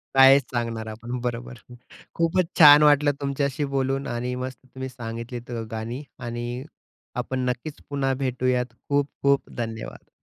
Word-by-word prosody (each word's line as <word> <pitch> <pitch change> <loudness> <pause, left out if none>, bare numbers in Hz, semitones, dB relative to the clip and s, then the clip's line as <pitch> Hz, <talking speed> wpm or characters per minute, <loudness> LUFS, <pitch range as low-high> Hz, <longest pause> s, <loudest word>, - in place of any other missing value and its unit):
कायच 135 +1 +8
सांगणार 115 -2 -2
आपण, 120 +3 -5
बरोबर. 120 0 -4 0.6
खूपच 165 +2 +2
छान 150 -1 +10
वाटलं 145 0 +5
तुमच्याशी 140 +1 -1
बोलून 135 +1 0
आणि 120 +1 -2
मस्त 130 -2 -8
तुम्ही 130 +1 -7
सांगितलीत 120 0 -7
अ, 115 - -3
गाणी. 115 +5 -4 0.2
आणि 120 +1 -4 0.5
आपण 130 +1 -2
नक्कीच 125 +5 -5
पुन्हा 135 -2 0
भेटूयात, 125 -2 0 0.2
खूप-खूप 140 -1 +1
धन्यवाद! 115 -2 -6
130 Hz, 130 wpm, -25 LUFS, 120-140 Hz, 0.6 s, छान